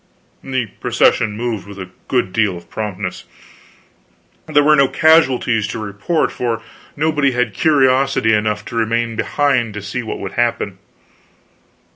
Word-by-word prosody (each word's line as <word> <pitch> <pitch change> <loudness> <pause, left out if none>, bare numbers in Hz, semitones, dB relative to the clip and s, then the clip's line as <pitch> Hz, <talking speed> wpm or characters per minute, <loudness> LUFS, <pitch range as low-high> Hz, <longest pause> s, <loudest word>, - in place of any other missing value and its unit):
The 130 -2 -1
procession 105 -3 +2
moved 110 -5 -3
with 100 -1 -10
a 95 -1 -7 0.2
good 120 -8 0
deal 105 -5 +1
of 85 - -15
promptness. 100 -3 -5 1.2
There 145 - +3
were 150 +1 +5
no 140 -2 +4
casualties 130 -9 +3
to - - -5
report, 105 - -1
for 115 -2 -3 0.3
nobody 150 -3 +1
had 125 0 0
curiosity 135 -5 +3
enough 105 0 0
to - - -8
remain 115 0 0
behind 125 -3 0
to 105 - -5
see 105 +5 -4
what 110 - -5
would 100 - -5
happen. 115 -5 -1
115 Hz, 140 wpm, -18 LUFS, 105-135 Hz, 1.2 s, were